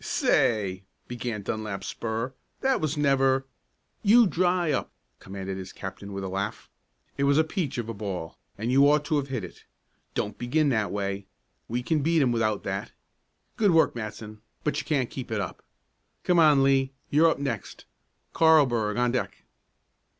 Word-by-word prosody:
"Say," 95 -5 +1 0.3
began 120 -3 -4
Dunlap 105 -2 -4
Spurr, 115 +3 -3 0.3
"that 265 -1 +2
was 155 -1 -1
never 135 -2 +3 0.3
" - - -47
"You 240 +1 +8
dry 180 -3 +1
up!" - - -1 0.3
commanded 95 0 -6
his 95 0 -8
captain 100 0 -8
with 100 0 -5
a - - -3
laugh. 100 +3 -4 0.5
"It 140 - +3
was 140 +1 +4
a 160 - +5
peach 160 -4 -3
of 120 -2 -3
a 115 - -4
ball, 100 -6 -5 0.2
and 110 +4 -2
you 140 +2 +6
ought 150 0 +3
to 155 0 +1
have 140 -1 -1
hit 130 -6 -3
it. 90 - -10 0.5
Don't 105 - -3
begin 145 +5 +1
that 110 -5 0
way. 100 -1 -3 0.4
We 120 +2 -2
can 155 +2 +1
beat 160 +1 +3
'em 125 - +2
without 110 -3 0
that. 95 +1 -4 0.7
Good 210 -2 +4
work, 165 -2 +4
Matson, 110 -1 -7 0.2
but 150 - 0
you - - -5
can't 135 -6 0
keep 130 -2 -6
it 110 -2 -1
up. 95 -4 -5 0.6
Come 180 -1 +3
on, 150 -4 +6
Lee; 135 0 +2 0.2
you're 160 +3 +5
up - - 0
next. 135 -7 -5 0.5
Carlburg 125 -10 +4
on 120 0 +2
deck." 125 - -3
125 Hz, 175 wpm, -27 LUFS, 105-150 Hz, 0.7 s, You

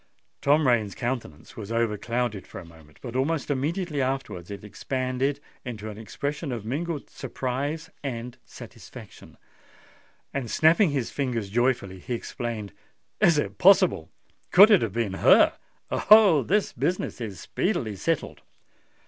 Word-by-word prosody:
Tom 150 +2 +3
Rain's 110 -5 +1
countenance 120 - -5
was 110 -1 -7
overclouded 115 -1 -1
for - - -10
a 90 - -11
moment; 80 -3 -18
but 120 -1 -7
almost 145 +3 0
immediately 150 +2 -1
afterwards 130 -10 -3
it 100 0 -8
expanded 130 +6 -2 0.2
into 110 -3 -6
an 105 - -10
expression 145 +6 -4
of 115 -4 -5
mingled 150 +5 -3
surprise 140 +5 -4
and 120 -3 -5
satisfaction; - - -13 1.0
and 135 -4 -3
snapping 165 +4 +4
his 135 -5 -2
fingers 120 -8 -3
joyfully, 115 -5 0
he 120 +7 -4
exclaimed, 115 -3 -5 0.5
"Is 175 -7 +4
it 150 - -2
possible? 185 - +5 0.4
could 205 +4 +8
it 205 - +6
have 110 -4 -2
been 115 -4 -1
her? - - +6 0.4
Oh! 205 -8 +6
this 205 +8 0
business 180 -7 -2
is 105 -6 -6
speedily 110 -2 -2
settled!" 160 - -2
125 Hz, 135 wpm, -26 LUFS, 110-150 Hz, 1.0 s, could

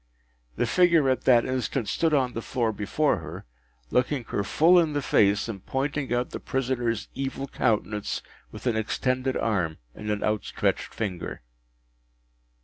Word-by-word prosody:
The - - +1
figure 165 +1 +4
at 130 - -2
that 120 -2 +5
instant 130 -2 -1
stood 165 -1 +1
on 130 -4 +2
the 115 - -3
floor 115 -2 -1
before 110 +8 0
her, - - -8 0.5
looking 130 +1 +1
her 100 - -1
full 170 - +5
in 160 -3 +1
the 145 - 0
face, 100 -2 +3
and 100 -5 -6
pointing 135 0 -2
out 120 +1 0
the - - -5
prisoner’s 125 -4 -1
evil 135 0 -3
countenance 105 -4 -1 0.3
with - - -10
an 120 -3 +2
extended 130 +4 0
arm 90 -8 0 0.2
and 105 - -7
an 105 -1 -1
outstretched 105 -1 -1
finger. 95 - -4
125 Hz, 150 wpm, -26 LUFS, 110-135 Hz, 0.5 s, that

